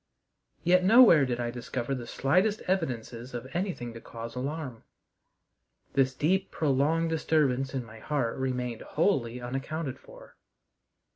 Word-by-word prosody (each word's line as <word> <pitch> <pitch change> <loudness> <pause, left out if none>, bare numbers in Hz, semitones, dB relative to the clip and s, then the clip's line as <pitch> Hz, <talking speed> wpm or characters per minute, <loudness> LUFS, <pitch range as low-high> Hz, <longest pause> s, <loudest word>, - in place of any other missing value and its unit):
Yet 180 +1 +4
nowhere 190 - +7
did 120 -1 -2
I 120 -1 -1
discover 125 +1 -4
the 120 -3 -5
slightest 185 - +1
evidences 125 -8 -3
of 120 +2 -5
anything 175 - -3
to 115 - -9
cause 115 0 -8
alarm. 135 -2 -4 1.1
This 135 -1 +2
deep, 190 +7 +1
prolonged 155 +3 +1
disturbance 140 -4 +1
in 130 -2 -2
my 110 0 -12
heart 130 -3 -1
remained 125 -3 -2
wholly 130 - 0
unaccounted 135 +3 -4
for. - - -15
135 Hz, 130 wpm, -29 LUFS, 120-165 Hz, 1.1 s, nowhere